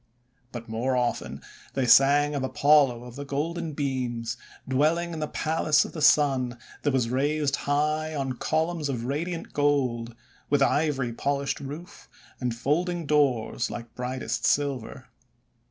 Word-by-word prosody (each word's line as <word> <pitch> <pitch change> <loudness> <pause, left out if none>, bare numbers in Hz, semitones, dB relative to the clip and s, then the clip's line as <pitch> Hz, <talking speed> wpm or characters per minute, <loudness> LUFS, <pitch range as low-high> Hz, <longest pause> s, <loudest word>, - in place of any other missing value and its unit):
But 120 -1 -7
more 120 +4 -1
often 120 -1 -2 0.3
they 135 -1 +1
sang 145 +4 +5
of 140 - -1
Apollo 135 -3 +3
of 125 -1 -10
the 140 - -5
Golden 160 +3 -3
Beams, 125 -5 -2 0.3
dwelling 160 +6 +1
in 160 - -5
the 155 - -2
Palace 155 -2 +1
of - - -8
the 155 - -5
Sun 135 -5 +3 0.2
that 145 - +1
was 125 -3 0
raised 145 +2 +1
high 155 +2 0
on 135 -2 -2
columns 160 +3 -1
of 120 -3 -3
radiant 165 +6 -3
gold, 125 -6 0 0.3
with 145 -1 +4
ivory 135 -5 +1
polished 140 +3 -1
roof, 155 +8 -9 0.3
and 125 -2 -2
folding 170 +7 -1
doors 140 -6 +1
like 120 -1 -7
brightest 125 +1 -3
silver. 140 -5 0
140 Hz, 140 wpm, -26 LUFS, 125-150 Hz, 0.3 s, sang